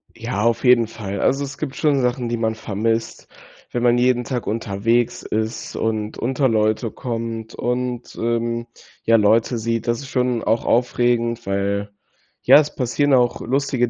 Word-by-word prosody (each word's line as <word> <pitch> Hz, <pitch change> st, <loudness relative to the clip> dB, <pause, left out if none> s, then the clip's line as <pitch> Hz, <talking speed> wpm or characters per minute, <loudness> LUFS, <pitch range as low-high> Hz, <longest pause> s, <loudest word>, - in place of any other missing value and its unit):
Ja, 115 Hz, -3 st, -3 dB
auf 115 Hz, -1 st, +1 dB
jeden 125 Hz, -3 st, +5 dB
Fall. 100 Hz, -3 st, -6 dB
Also, 135 Hz, +2 st, +2 dB
es 140 Hz, 0 st, -7 dB
gibt 140 Hz, -3 st, -5 dB
schon 145 Hz, -3 st, +2 dB
Sachen, 125 Hz, -1 st, -1 dB
die 120 Hz, -, -1 dB
man 110 Hz, -1 st, -1 dB
vermisst, 110 Hz, +2 st, -2 dB, 0.4 s
wenn 120 Hz, -, -2 dB
man 120 Hz, 0 st, +4 dB
jeden 125 Hz, 0 st, +2 dB
Tag 125 Hz, -2 st, -4 dB
unterwegs 115 Hz, +2 st, 0 dB
ist 110 Hz, +1 st, -3 dB
und 110 Hz, -1 st, -2 dB
unter 130 Hz, +3 st, +1 dB
Leute 110 Hz, 0 st, +1 dB
kommt 115 Hz, -2 st, -5 dB
und, 125 Hz, 0 st, -3 dB
ähm, 115 Hz, 0 st, -1 dB, 0.4 s
ja, 115 Hz, 0 st, +4 dB
Leute 110 Hz, +3 st, +3 dB
sieht. 115 Hz, +1 st, -2 dB
Das 120 Hz, 0 st, +1 dB
ist 140 Hz, -, -8 dB
schon 125 Hz, -3 st, 0 dB
auch 115 Hz, +1 st, +1 dB
aufregend, 120 Hz, -1 st, +1 dB
weil, 100 Hz, +1 st, -1 dB, 0.5 s
ja, -, -, +7 dB
es 150 Hz, -1 st, -1 dB
passieren 135 Hz, +3 st, +1 dB
auch 125 Hz, -2 st, +3 dB
lustige 130 Hz, -1 st, 0 dB
115 Hz, 165 wpm, -21 LUFS, 110-125 Hz, 0.5 s, ja